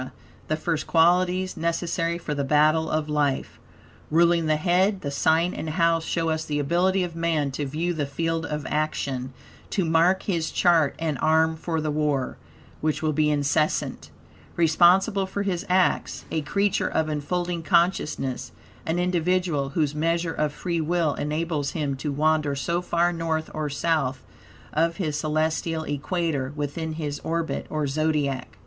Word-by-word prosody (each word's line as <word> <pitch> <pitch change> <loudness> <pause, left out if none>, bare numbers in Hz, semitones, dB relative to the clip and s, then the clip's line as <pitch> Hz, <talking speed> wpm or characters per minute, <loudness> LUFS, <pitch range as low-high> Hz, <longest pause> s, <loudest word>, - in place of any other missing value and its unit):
the 155 - +1
first 155 0 -2
qualities 180 +2 +3
necessary 170 0 -1
for 165 -3 -4
the 140 -1 -1
battle 155 +3 +3
of 155 -1 -1
life. 145 -3 -1 0.5
Ruling 170 0 +3
the 155 - +3
head, 185 +5 +2
the 140 - -3
sign 160 +5 +2
and 160 - -4
house 165 0 +2
show 165 -1 -1
us 160 0 -1
the 150 -2 -2
ability 180 +6 +2
of 170 -2 -5
man 165 -4 0
to 140 +1 -3
view 165 +6 -1
the 150 -4 -2
field 165 +3 -2
of 150 -2 -4
action, 140 -4 -2 0.4
to 190 - 0
mark 165 +4 +3
his 170 -5 -1
chart, 165 -5 +3
and 155 -4 -2
arm 160 +1 +3
for 160 0 -3
the 155 -1 -1
war 145 -3 0 0.4
(which 155 0 -1
will 155 -1 +1
be 150 +1 +2
incessant); 150 +1 0 0.5
responsible 185 +5 +4
for 200 +1 -3
his 185 -4 -2
acts, 185 0 +1
a 160 - 0
creature 200 +7 0
of 160 - 0
unfolding 170 +3 -2
consciousness, 160 -6 0 0.4
an 160 +2 0
individual, 175 -4 0
whose 150 0 0
measure 165 +2 0
of 150 -1 0
free 170 +2 -2
will 165 -1 +1
enables 150 -1 -2
him 145 -4 -1
to 145 +2 -3
wander 150 0 +1
so 170 +5 -1
far 175 0 +1
North 160 -1 -2
or 155 -1 -2
South 140 -3 -1 0.5
of 165 +2 +1
his 155 -6 -2
celestial 160 +1 -1
equator, 145 -2 -2
within 155 +2 -3
his 150 -2 -4
orbit, 165 0 -2
or 155 -1 -1
Zodiac. 145 -2 -1
160 Hz, 155 wpm, -25 LUFS, 150-170 Hz, 0.5 s, responsible